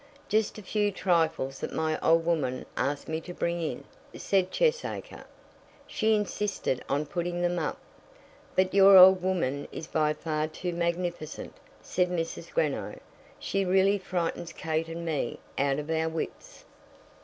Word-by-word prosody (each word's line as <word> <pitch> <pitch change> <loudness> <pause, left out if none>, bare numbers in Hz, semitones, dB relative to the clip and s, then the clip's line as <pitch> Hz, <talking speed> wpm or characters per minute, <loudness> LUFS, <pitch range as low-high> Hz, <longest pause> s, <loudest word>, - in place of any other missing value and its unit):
"Just 215 0 +1
a 215 - -9
few 205 +1 0
trifles 160 -8 0
that - - -4
my 160 0 0
old 165 0 +3
woman 150 -7 0
asked 140 +1 -1
me 160 0 -2
to 175 0 -9
bring 170 0 -1
in," 160 - -3 0.3
said 190 -2 +1
Cheesacre. 480 - -1 0.6
"She 220 0 +1
insisted 205 -9 -2
on 145 +2 0
putting 175 +3 -3
them 175 0 +1
up." 155 - -2 0.8
"But 185 0 +2
your 195 0 +8
old 185 0 +9
woman 165 -7 -1
is 160 - -6
by 155 -1 +1
far 155 -1 -2
too 175 +3 -5
magnificent," 170 -2 -3 0.3
said 180 -1 0
Mrs. 165 -2 -4
Greenow. - - -1 0.4
"She 195 - -1
really 190 +2 +3
frightens 175 -2 -3
Kate 160 0 -2
and 165 +1 -6
me 150 -7 -2 0.2
out 140 0 +2
of 150 +2 -4
our 160 0 +1
wits." 160 0 -6
170 Hz, 150 wpm, -28 LUFS, 155-185 Hz, 0.8 s, old